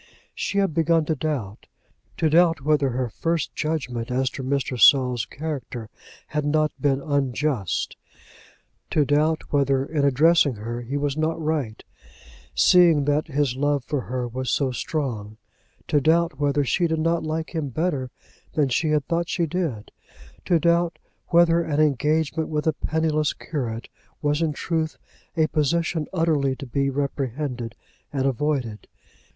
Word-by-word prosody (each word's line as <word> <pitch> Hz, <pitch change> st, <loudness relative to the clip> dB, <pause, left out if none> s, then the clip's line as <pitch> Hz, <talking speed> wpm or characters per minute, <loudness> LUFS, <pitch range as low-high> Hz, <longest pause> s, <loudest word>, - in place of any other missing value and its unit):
She 200 Hz, -, -3 dB
had 195 Hz, -5 st, +2 dB
begun 165 Hz, 0 st, +2 dB
to 160 Hz, -, 0 dB
doubt; 130 Hz, -9 st, -4 dB, 0.5 s
to 160 Hz, -, +2 dB
doubt 165 Hz, 0 st, +4 dB
whether 145 Hz, -1 st, +2 dB
her 125 Hz, 0 st, -1 dB
first 165 Hz, +7 st, -2 dB
judgment 130 Hz, -7 st, -3 dB
as 130 Hz, +1 st, 0 dB
to -, -, -6 dB
Mr. 130 Hz, -2 st, -2 dB
Saul's 125 Hz, -4 st, +5 dB
character 135 Hz, -7 st, -6 dB, 0.4 s
had 150 Hz, 0 st, -1 dB
not 155 Hz, +1 st, +2 dB
been 140 Hz, -2 st, +2 dB
unjust, 140 Hz, -, -1 dB, 0.9 s
to 150 Hz, -, +2 dB
doubt 150 Hz, +3 st, +1 dB
whether, 135 Hz, -1 st, +2 dB
in 150 Hz, -1 st, -1 dB
addressing 145 Hz, 0 st, +4 dB
her, 115 Hz, +3 st, -5 dB
he 130 Hz, +4 st, -3 dB
was 145 Hz, -1 st, -1 dB
not 155 Hz, +1 st, -1 dB
right, 150 Hz, -8 st, -2 dB, 0.7 s
seeing 160 Hz, -, +5 dB
that 145 Hz, +1 st, +1 dB
his 140 Hz, -4 st, 0 dB
love 145 Hz, 0 st, 0 dB
for 145 Hz, -1 st, -1 dB
her 125 Hz, 0 st, -3 dB
was 130 Hz, +2 st, -4 dB
so 135 Hz, -3 st, +1 dB
strong, 115 Hz, -5 st, -3 dB, 0.5 s
to 145 Hz, -, +2 dB
doubt 160 Hz, -1 st, +2 dB
whether 145 Hz, 0 st, +2 dB
she 170 Hz, +6 st, +1 dB
did 160 Hz, -1 st, -1 dB
not 165 Hz, +1 st, +1 dB
like 160 Hz, +1 st, -3 dB
him 155 Hz, -4 st, -2 dB
better 140 Hz, -2 st, -1 dB, 0.4 s
than 145 Hz, -3 st, +2 dB
she 155 Hz, +5 st, +1 dB
had 150 Hz, -2 st, +1 dB
thought 170 Hz, +2 st, -1 dB
she 170 Hz, -, 0 dB
did, 155 Hz, -, -3 dB, 0.5 s
to 170 Hz, -2 st, +3 dB
doubt 170 Hz, 0 st, +2 dB, 0.3 s
whether 170 Hz, -1 st, +4 dB
an 155 Hz, -3 st, -1 dB
engagement 155 Hz, +2 st, +1 dB
with 150 Hz, -1 st, -2 dB
a 160 Hz, -, +2 dB
penniless 155 Hz, -1 st, 0 dB
curate 120 Hz, -7 st, -4 dB, 0.3 s
was 150 Hz, +1 st, 0 dB
in 160 Hz, -2 st, +1 dB
truth 160 Hz, +1 st, -2 dB, 0.4 s
a 160 Hz, -, +4 dB
position 160 Hz, +1 st, 0 dB
utterly 155 Hz, -6 st, +1 dB
to 135 Hz, -, -8 dB
be 140 Hz, +2 st, 0 dB
reprehended 135 Hz, -3 st, -3 dB, 0.4 s
and 135 Hz, -2 st, -1 dB
avoided. 135 Hz, -4 st, -1 dB
145 Hz, 150 wpm, -24 LUFS, 130-160 Hz, 0.9 s, Saul's